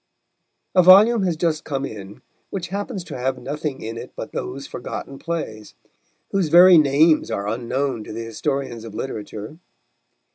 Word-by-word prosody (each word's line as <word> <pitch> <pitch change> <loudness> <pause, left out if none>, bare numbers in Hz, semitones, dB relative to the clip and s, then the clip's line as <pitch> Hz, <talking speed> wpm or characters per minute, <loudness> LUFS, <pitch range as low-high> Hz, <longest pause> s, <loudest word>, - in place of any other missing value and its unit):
A 185 - +6
volume 205 +6 +7
has 175 -3 0
just 160 -2 0
come 140 -2 -3
in 105 +1 -9 0.3
which 180 -3 -5
happens 200 0 -4
to - - -8
have 130 +1 -1
nothing 140 +2 -5
in 115 +1 -5
it - - -8
but - - -7
those - - -5
forgotten 135 0 -7
plays, 110 -11 -5 0.6
whose 190 -5 +1
very 175 +1 +8
names 150 +1 +3
are 100 -3 -3
unknown 120 +2 -2
to - - -9
the 115 +1 -5
historians 130 0 -3
of 110 -2 -9
literature. 110 +3 -6
140 Hz, 155 wpm, -22 LUFS, 115-170 Hz, 0.6 s, very